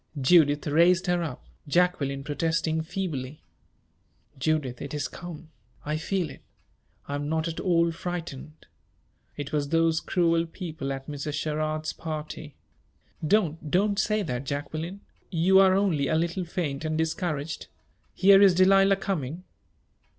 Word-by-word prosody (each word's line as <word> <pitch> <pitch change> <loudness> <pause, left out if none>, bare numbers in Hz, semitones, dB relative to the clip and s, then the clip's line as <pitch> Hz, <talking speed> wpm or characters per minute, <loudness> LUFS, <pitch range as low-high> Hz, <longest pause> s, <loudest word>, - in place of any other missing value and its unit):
Judith 145 0 +4
raised 170 +4 +4
her 175 -1 +1
up, 155 -6 -5 0.2
Jacqueline 145 -4 +1
protesting 160 +2 0
feebly. 155 -5 -4 1.0
"Judith, 135 -4 -1
it 140 - -5
is 145 -1 -1
come! 170 -2 -10 0.3
I 150 +1 -1
feel 170 -1 -2
it. - - -13 0.7
I 140 - -4
am 145 +1 -3
not 160 +1 0
at 165 - -4
all 170 -2 +2
frightened. 165 -4 -6 0.7
It 145 0 -5
was 145 -2 0
those 165 0 +3
cruel 170 -2 +1
people 160 -5 -5
at 135 0 -5
Mrs. 145 0 -4
Sherrard's 155 +1 -2
party 155 -2 -6 0.4
" 155 - -10
"Don't 160 -5 -5
don't 200 +4 +2
say 215 0 +1
that, 125 -6 -3
Jacqueline! 155 +7 -4 0.3
You 185 +2 +4
are 190 -1 +6
only 175 -8 +1
a 160 - +1
little 170 +3 -1
faint 155 -4 -3
and 155 0 -1
discouraged. 160 -2 -2 0.5
Here 195 +1 +7
is 195 -3 +6
Delilah 195 +1 +5
coming." 175 -4 -3
160 Hz, 140 wpm, -27 LUFS, 145-175 Hz, 1.0 s, Here